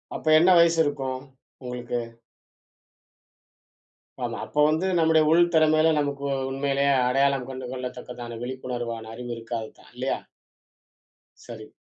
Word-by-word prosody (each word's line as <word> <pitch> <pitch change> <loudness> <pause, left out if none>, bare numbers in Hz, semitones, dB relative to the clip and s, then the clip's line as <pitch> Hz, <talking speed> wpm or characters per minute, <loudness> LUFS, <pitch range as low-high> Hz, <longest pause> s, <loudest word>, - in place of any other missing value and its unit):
அப்ப - - -7
என்ன 175 +3 +5
வயசு 170 -1 +4
இருக்கும், 135 -3 -3 0.4
உங்களுக்கு? 125 -1 -4 2.2
ஆமா. - - -3
அப்போ 150 - -4
வந்து 160 +5 +1
நம்முடைய 160 -1 +4
உள் 170 +1 +6
திறமையில 155 0 +4
நமக்கு 140 -1 -2 0.2
உண்மையிலேயே 140 +1 +1 0.2
அடையாளம் 135 0 +1
கண்டு 130 -1 -6
கொள்ளத்தக்கதான 125 -2 -7
விழிப்புணர்வான 120 -3 -5
அறிவு 120 +1 -7
இருக்காதுதான் 115 -1 -7
இல்லையா? - - -2 1.3
சரி. - - -10
135 Hz, 105 wpm, -25 LUFS, 125-155 Hz, 2.2 s, உள்